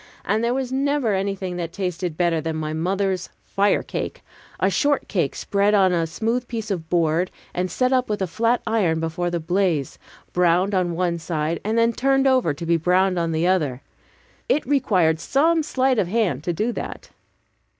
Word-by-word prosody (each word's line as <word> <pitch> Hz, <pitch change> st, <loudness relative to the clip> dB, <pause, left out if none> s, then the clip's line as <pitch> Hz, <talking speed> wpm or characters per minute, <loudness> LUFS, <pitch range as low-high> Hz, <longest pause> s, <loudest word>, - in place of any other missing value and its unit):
And 215 Hz, +3 st, +1 dB
there 240 Hz, +2 st, +1 dB
was 260 Hz, -1 st, -2 dB
never 275 Hz, -3 st, +1 dB
was 195 Hz, -, +1 dB
anything 190 Hz, -2 st, -3 dB
that 170 Hz, -2 st, -4 dB
tasted 180 Hz, -3 st, -3 dB
better 170 Hz, -2 st, +1 dB
than 160 Hz, 0 st, -3 dB
my 155 Hz, 0 st, -3 dB
mother's 185 Hz, +3 st, -1 dB, 0.2 s
"firecake," 200 Hz, +1 st, -1 dB, 0.4 s
a -, -, +3 dB
short 290 Hz, -1 st, +1 dB
cake 170 Hz, -9 st, -1 dB
spread 200 Hz, +1 st, +1 dB
on 190 Hz, -2 st, +4 dB
a 165 Hz, -1 st, +1 dB
smooth 230 Hz, +8 st, -2 dB
piece 225 Hz, -3 st, -4 dB
of 165 Hz, -4 st, -4 dB
board, 170 Hz, +1 st, +1 dB, 0.2 s
and 180 Hz, +1 st, -1 dB
set 255 Hz, +8 st, +1 dB
up 255 Hz, -2 st, +1 dB
with 210 Hz, 0 st, -1 dB
a 190 Hz, -, 0 dB
flat 230 Hz, +7 st, 0 dB
iron 200 Hz, -8 st, +1 dB
before 165 Hz, +2 st, -2 dB
the 175 Hz, 0 st, -2 dB
blaze, 170 Hz, -4 st, 0 dB, 0.3 s
browned 180 Hz, +3 st, +2 dB
on 180 Hz, -3 st, 0 dB
one 170 Hz, -1 st, 0 dB
side, 160 Hz, 0 st, -2 dB
and 220 Hz, +2 st, -1 dB
then 230 Hz, 0 st, +3 dB
turned 270 Hz, +2 st, +2 dB
over 260 Hz, -, +3 dB
to 155 Hz, +4 st, -6 dB
be 170 Hz, 0 st, +3 dB
browned 180 Hz, +2 st, +2 dB
on 165 Hz, -1 st, -1 dB
the 160 Hz, +1 st, 0 dB
other. 150 Hz, -9 st, +1 dB, 0.7 s
(It 300 Hz, -, +2 dB
required 190 Hz, -, +2 dB
some 320 Hz, -, +2 dB
sleight 260 Hz, -4 st, +1 dB
of 185 Hz, -, +1 dB
hand 185 Hz, -, 0 dB
to 175 Hz, -, +1 dB
do 215 Hz, +8 st, -1 dB
that.) -, -, -7 dB
185 Hz, 190 wpm, -22 LUFS, 170-230 Hz, 0.7 s, on